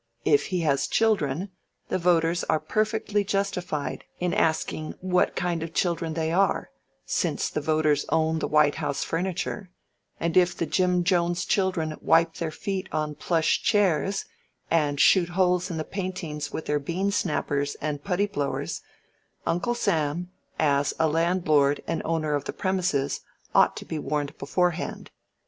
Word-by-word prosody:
If 145 -2 +3
he 180 -2 -1
has 140 -4 +1
children, 190 -5 +1 0.4
the - - 0
voters 170 0 +2
are 155 - +2
perfectly 215 0 0
justified 190 -6 -2 0.2
in 175 -1 0
asking 155 -1 0
what 180 0 +1
kind 175 -2 -1
of 165 0 -6
children 165 -3 0
they 160 -1 -1
are, 190 +3 +1 0.3
since - - 0
the 150 - -2
voters 155 -1 +2
own 160 0 +1
the - - -1
White 150 -1 +4
House 145 -2 -1
furniture, 185 +3 -3 0.5
and 165 0 -1
if 180 -1 +4
the 170 - 0
Jim 180 +2 +2
Jones 175 0 +1
children 175 -6 0
wipe 165 0 +4
their 165 - -2
feet 190 +3 -4
on 155 -1 -1
plush 160 +2 +1
chairs, 195 -1 +2 0.5
and 145 -3 +2
shoot 175 +1 +5
holes 180 +1 +2
in 170 - -4
the 155 - -1
paintings 170 -6 -4
with 160 - -5
their 150 0 +1
bean 180 +7 -1
snappers 145 -6 -1
and 145 -1 -4
putty 195 +1 +1
blowers, 140 -7 -3 0.6
Uncle 200 +8 0
Sam, 175 -5 0 0.3
as 140 -2 +2
a 160 - +3
landlord 155 -3 +2
and - - -2
owner 155 -2 0
of 145 -1 -1
the - - -4
premises, 180 -7 0 0.3
ought - - +4
to - - -7
be 160 - -4
warned 145 0 -2
beforehand. 175 +4 -1
165 Hz, 155 wpm, -26 LUFS, 150-185 Hz, 0.6 s, shoot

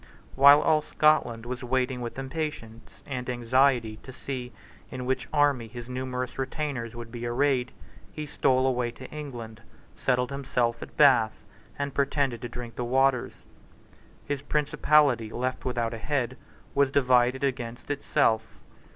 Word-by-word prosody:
While 140 +2 +8
all 155 0 +3
Scotland 150 -7 +2
was 125 +1 -5
waiting 125 0 0
with 120 +1 -5
impatience 130 -6 -6
and 125 -2 -5
anxiety 120 -2 +2
to 130 - -12
see 130 -1 -6 0.4
in 125 -1 -6
which 130 +1 -1
army 145 -6 +2
his 120 +2 -9
numerous 125 0 -4
retainers 130 -4 -3
would 115 -1 -8
be 120 0 -5
arrayed, 130 0 +1 0.4
he 155 - -6
stole 130 -3 +2
away 125 -2 +1
to 130 +2 -10
England, 120 -7 -7 0.3
settled 125 0 0
himself 125 -4 -1
at - - -10
Bath, 125 -7 +4 0.3
and 140 -1 -3
pretended 140 -4 0
to 120 - -5
drink 120 0 -8
the 125 - -2
waters, 130 +1 +1 0.8
His 145 -2 -3
principality, 145 -5 +2
left 130 +3 -3
without 120 -2 -1
a 115 - -6
head, 130 -1 -1 0.4
was 140 -1 +3
divided 125 -1 +3
against 125 -1 -3
itself. 110 -5 0
125 Hz, 140 wpm, -27 LUFS, 120-140 Hz, 0.8 s, While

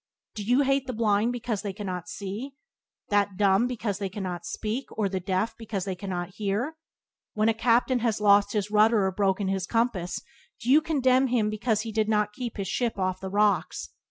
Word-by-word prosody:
Do 210 - -5
you 245 +7 +3
hate 275 -1 +1
the 255 - -3
blind 220 0 +2
because 235 -4 -3
they 200 -2 -4
cannot 185 -4 -5
see, 215 +8 -6 0.5
that 205 -2 +1
dumb 200 +3 +4
because 220 -5 -3
they 195 -2 -2
cannot 185 -3 -5
speak, 225 +5 -3
or 210 -2 +2
the 190 -1 -2
deaf 185 +4 -1
because 210 -5 -4
they 195 - -2
cannot 180 -2 -4
hear? 215 +9 -1 0.6
When 215 +1 +3
a - - +3
captain 240 +2 +2
has 225 -3 0
lost 205 -1 +4
his 210 -1 -1
rudder 215 -1 +4
or 190 - +1
broken 195 0 0
his 190 -2 -1
compass, 225 -7 0 0.4
do 240 - -1
you 300 +3 +7
condemn 265 -4 +3
him 225 -4 +1
because 215 0 0
he 225 0 -5
did 215 0 0
not 210 -1 +1
keep 240 -1 -5
his 195 -1 -3
ship 240 -4 -1
off 185 -1 -1
the 190 - -4
rocks? 205 +1 +1
210 Hz, 200 wpm, -27 LUFS, 195-235 Hz, 0.6 s, you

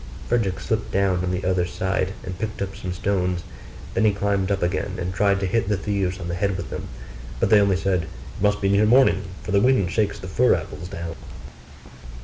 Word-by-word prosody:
Frederick 105 -6 +1
slipped 110 -1 -2
down 95 -2 +1
on 90 - -1
the 90 +1 -2
other 90 -1 +2
side, 95 +1 -1
and 90 -1 -6
picked 110 +1 -4
up 95 -1 -3
some 90 - -5
stones. 90 -1 -1 0.5
Then - - +1
he 110 - +5
climbed 100 -1 0
up 100 -2 0
again, 90 +1 -1
and 90 0 -3
tried 100 +1 +2
to - - +1
hit 105 +2 0
the 105 - +2
thieves 100 -1 -1
on 85 - -5
the 85 - -3
head 95 +2 0
with - - -6
them: - - -5 0.5
but - - +1
they 105 -1 +7
only 100 -2 +3
said, 95 -3 0
'It 80 - -12
must 105 0 +2
be 100 - +2
near 100 +2 +4
morning, 115 -6 +5 0.2
for - - -5
the 100 0 +4
wind 125 -8 +3
shakes 105 -1 0
the 95 - -8
fir 90 - +3
apples 80 +4 -6
down. 85 -3 -5
95 Hz, 220 wpm, -23 LUFS, 90-100 Hz, 0.5 s, they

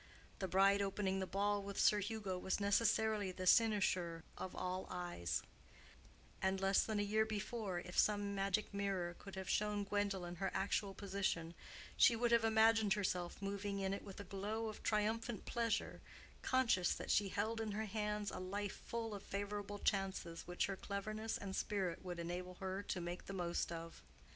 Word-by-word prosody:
The 190 - -1
bride 195 +2 +5
opening 195 -1 0
the 190 - -2
ball 205 +2 +1
with 200 0 -5
Sir 210 - +5
Hugo 205 -3 -3
was 190 - 0
necessarily 210 0 +2
the 185 0 -5
cynosure 185 -6 +3
of 185 - -6
all 185 +1 -2
eyes; 175 - -2 1.0
and 190 0 +1
less 195 0 +4
than 215 -2 -1
a - - +2
year 215 +2 +3
before, 215 -2 -3
if 180 0 -2
some 205 -1 +3
magic 195 +1 0
mirror 195 -3 -1
could 200 -1 -9
have 190 -1 -5
shown 210 -1 +1
Gwendolen 195 -3 -1
her 195 +1 0
actual 195 0 0
position, 190 -4 -1 0.4
she 235 - +7
would 235 +1 +1
have 235 -1 +5
imagined 220 -2 +5
herself 185 -2 -2
moving 200 0 -2
in 195 0 0
it 200 - -4
with 195 -1 -9
a - - -4
glow 210 +4 -3
of 215 - -8
triumphant 220 +1 0
pleasure, 230 -1 -1 0.4
conscious 230 -9 +3
that - - -3
she 200 -1 +3
held 220 +4 -1
in 215 -2 -2
her 220 +2 -1
hands 210 -1 -2
a - - -5
life 200 +2 -3
full 230 -2 -2
of 200 - -5
favorable 205 +1 -4
chances 190 -4 -1
which 175 0 0
her 195 - -2
cleverness 215 +3 -3
and 190 -1 -5
spirit 190 -5 -1
would 180 -2 -4
enable 180 +2 -4
her 190 +1 -3
to 195 - -3
make 175 +1 -5
the 195 - -4
best 175 -2 -1
of. 165 0 -6
200 Hz, 175 wpm, -39 LUFS, 185-210 Hz, 1.0 s, she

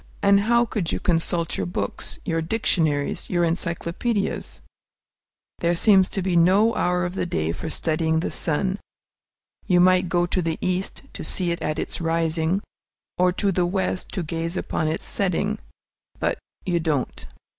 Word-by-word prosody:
And 200 0 +6
how 235 +3 +3
could 200 -7 -2
you - - -1
consult 165 -1 0
your 95 - -1
books, 90 - -4
your 165 0 0
dictionaries, 160 -6 0
your 175 -1 +2
encyclopædias? 170 +5 -2 1.0
There 170 0 +2
seems 190 0 +5
to 195 - -2
be 185 -1 0
no 195 +7 +5
hour 180 0 +1
of 175 - -3
the 185 - -2
day 80 - -1
for 90 - -5
studying 160 0 0
the - - -2
sun. 185 +5 0 0.9
You 180 -2 +4
might 185 0 +4
go 175 0 +2
to 180 +1 0
the 165 -1 -1
East 185 +6 -2
to - - -6
see 180 -2 0
it 170 - -3
at 155 0 -1
its - - -3
rising, 165 +2 0 0.6
or 180 0 +4
to 200 +1 +1
the 180 -1 +1
West 185 0 -1
to 185 - -2
gaze 165 +2 -3
upon 155 - -1
its 155 - -2
setting, 200 +2 0 0.6
but - - 0 0.3
you 175 -2 +1
don't. 155 -5 -2
175 Hz, 165 wpm, -24 LUFS, 165-190 Hz, 1.0 s, And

